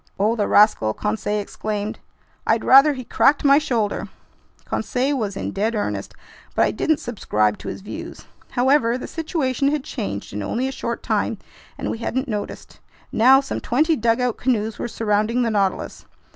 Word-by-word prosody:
"Oh, 215 +3 +2
the 210 -3 0
rascal!" 205 - +4
Conseil 210 0 -1
exclaimed. 210 +1 -4 0.5
"I'd - - +2
rather 275 +3 +7
he 255 -2 -6
cracked 280 +4 +3
my 280 +1 +7
shoulder!" 230 -9 -1 0.6
Conseil 265 +3 -1
was 210 -6 -3
in - - -3
dead 215 +4 -1
earnest, 205 - -3 0.4
but - - +4
I - - +1
didn't 315 -1 +1
subscribe 105 - -1
to - - -9
his - - -5
views. 205 - -8 0.2
However, 250 -2 +2
the - - -6
situation 295 -5 -1
had 290 -1 0
changed 100 - -5
in 105 - -3
only 240 - -1
a - - -3
short 235 -3 -4
time - - 0 0.4
and - - -3
we 225 - -5
hadn't 260 +4 -2
noticed. 210 -4 -6 0.3
Now 260 +4 +6
some 270 - -4
twenty 310 +6 +2
dugout 235 -1 +1
canoes 225 -4 -1
were - - -2
surrounding 220 +2 0
the 230 - 0
Nautilus. 195 -3 -1
230 Hz, 170 wpm, -22 LUFS, 210-265 Hz, 0.6 s, rather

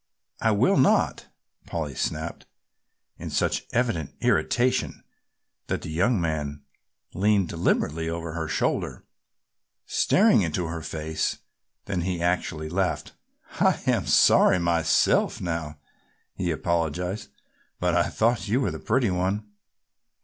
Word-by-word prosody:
"I 115 - +3
will 105 -2 +3
not!" - - +2 0.4
Polly 80 -4 -3
snapped, 80 +5 -4 0.7
in - - -6
such - - -1
evident 115 - -1
irritation 125 +1 +1 0.6
that - - -2
the - - -6
young 95 +7 +2
man 75 -3 -3 0.5
leaned 100 -1 +2
deliberately 80 -1 0
over 85 -1 -4
her 80 -1 -3
shoulder 80 - -1 0.8
staring 210 - +4
into 85 0 -1
her 80 0 -4
face. 80 0 -3 0.5
Then 95 -3 -2
he 90 0 -2
actually 85 -3 -1
laughed. 90 +3 -1 0.5
"I - - +3
am - - +1
sorry - - +5
myself 85 -2 +2
now," 80 -4 -4 0.6
he 90 - -2
apologized, 85 +3 -2 0.5
"but 90 -1 +1
I 85 - +2
thought 115 0 +1
you 115 +6 +2
were 135 - 0
the - - -6
pretty 125 -7 +1
one." 95 +4 -2
85 Hz, 120 wpm, -25 LUFS, 80-100 Hz, 0.8 s, sorry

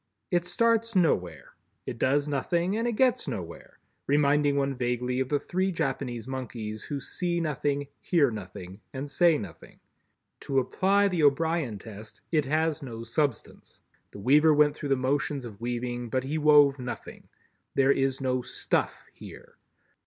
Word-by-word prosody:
It 175 -1 +1
starts 230 +4 +1
nowhere, 90 - 0 0.3
it 120 - -6
does 140 +2 +2
nothing 170 +7 0
and 230 +2 0
it 240 - 0
gets 255 0 +2
nowhere, 85 -3 -7 0.3
reminding 145 0 +3
one 140 -1 +1
vaguely 125 0 -1
of 130 -1 -1
the 145 - +2
three 190 +5 -1
Japanese 135 - -3
monkeys 115 -5 -5
who 145 - -4
see 175 +4 -2
nothing, 145 -2 -1
hear 150 -8 +2
nothing 95 -1 -8
and 135 +2 -4
say 165 +2 +3
nothing. 90 - -10 0.6
To 135 - -3
apply 195 +9 +2
the 180 -4 -1
O'Brien 150 -4 +2
test, 110 +1 -11
it 155 -4 +2
has 160 +2 0
no 115 -4 -7
Substance. 120 +1 -3 0.3
The - - -12
weaver 150 +8 +4
went 150 0 +4
through 145 - -5
the 135 - +4
motions 135 +1 -1
of 105 -3 -10
weaving, 120 0 -3
but 130 +2 -1
he 150 +4 -2
wove 145 -2 +5
nothing. 125 -1 -8 0.5
There 135 0 +4
is 135 -1 +1
no 130 -1 0
"stuff" - - -2
here. - - -13
140 Hz, 155 wpm, -27 LUFS, 125-160 Hz, 0.6 s, wove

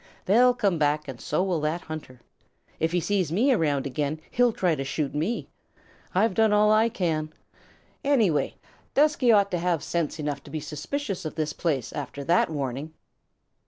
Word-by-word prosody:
"They'll 245 +5 +5
come 195 -8 +1
back, 150 0 +1
and 130 -3 -8
so 155 +5 0
will 185 -4 0
that 155 +3 -1
hunter. 145 -6 -8 0.6
If 160 +1 +1
he 175 - +2
sees 185 -3 0
me 245 +10 +3
around 145 - +1
again, 145 +3 -2
he'll 245 0 +3
try 180 -5 +1
to 135 -3 -2
shoot 140 +1 -2
me. 165 +11 -2 0.7
I've 205 +2 +3
done 220 +1 +3
all 210 0 +4
I 220 +2 +4
can 165 -8 -1
do. 155 - -26 0.7
Anyway, 230 - +2 0.4
Dusky 290 -4 +4
ought 200 -2 +4
to 175 - 0
have 170 -3 0
sense 165 0 -2
enough 145 -2 -3
to - - -11
be 155 - -4
suspicious 195 - -4
of 155 - -5
this 155 -2 -2
place 140 -8 -2
after 140 0 -5
that 170 +4 +3
warning. 145 +1 -4
165 Hz, 180 wpm, -26 LUFS, 150-210 Hz, 0.7 s, They'll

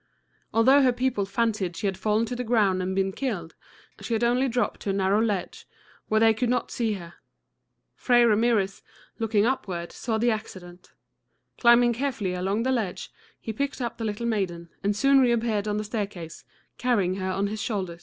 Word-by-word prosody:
Although 260 +5 +5
her 260 -2 +4
people 245 -5 -1
fancied 205 -4 -1
she - - -4
had 195 -1 0
fallen 215 +4 +1
to 245 - -5
the 250 - -3
ground 210 -6 +2
and 185 +1 -2
been 195 0 +1
killed, 190 -9 -4 0.5
she 235 - -4
had 225 - -1
only 245 +3 +2
dropped 245 +1 -1
to - - -5
a - - +1
narrow 195 +2 +2
ledge, 205 -5 -2 0.4
where 215 - +2
they 225 0 +5
could 240 +2 -1
not 250 - -1
see 225 -3 -1
her. 175 -4 -8 0.8
Fray 240 -1 +3
Ramirez, 215 -3 +2 0.4
looking 220 -2 +2
upward, 185 -9 -2
saw 225 -2 -2
the 235 +2 +2
accident. 185 -5 -7 0.7
Climbing 240 0 +5
carefully 235 -7 -2
along 195 +5 -1
the 260 - +1
ledge, 220 -8 -3 0.3
he 220 - -5
picked 280 +5 -3
up 240 -2 -4
the - - -3
little 215 +1 -3
maiden, 180 -7 -2
and 205 +1 +1
soon 275 +5 +4
reappeared 230 -4 +1
on 210 0 -1
the 210 - -2
staircase, 200 -6 -5 0.3
carrying 200 -7 +1
her 190 -1 -3
on 195 +2 -1
his 210 +1 -3
shoulder. 185 -7 -3
215 Hz, 185 wpm, -26 LUFS, 195-240 Hz, 0.8 s, Although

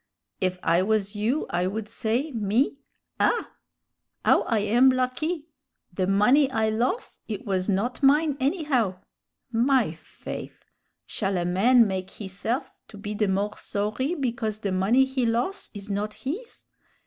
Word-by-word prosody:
If 185 -1 0
I 170 +2 +3
was 205 0 0
you 230 +9 0
I 180 +1 +1
would 210 +2 -3
say, 235 +7 -1
me, 225 +4 +1 0.4
'Ah! - - +1 0.7
'ow - - +5
I 230 - +2
am 230 +6 +4
lucky! 260 +6 -1 0.5
the 185 0 0
money 245 +9 +4
I 220 -4 +1
los', 245 - -1
it 220 +4 -5
was 190 -1 -1
not 215 +8 0
mine, 290 +2 +4
anyhow!' 265 - +1 0.5
My 240 - +3
faith! 165 - -9 0.4
shall 195 -3 -2
a 175 - -1
man 225 +7 +5
make 190 -2 -3
hisse'f 210 +6 -4 0.2
to 210 - -12
be 205 +1 -5
the 210 0 +1
more 200 +2 0
sorry 215 +10 -2
because 235 -7 -2
the 200 - -1
money 205 +8 +3
he 265 -1 -2
los' 240 - -1
is 200 0 -8
not 210 +1 -2
his? 370 - -6
220 Hz, 150 wpm, -26 LUFS, 200-260 Hz, 0.7 s, ow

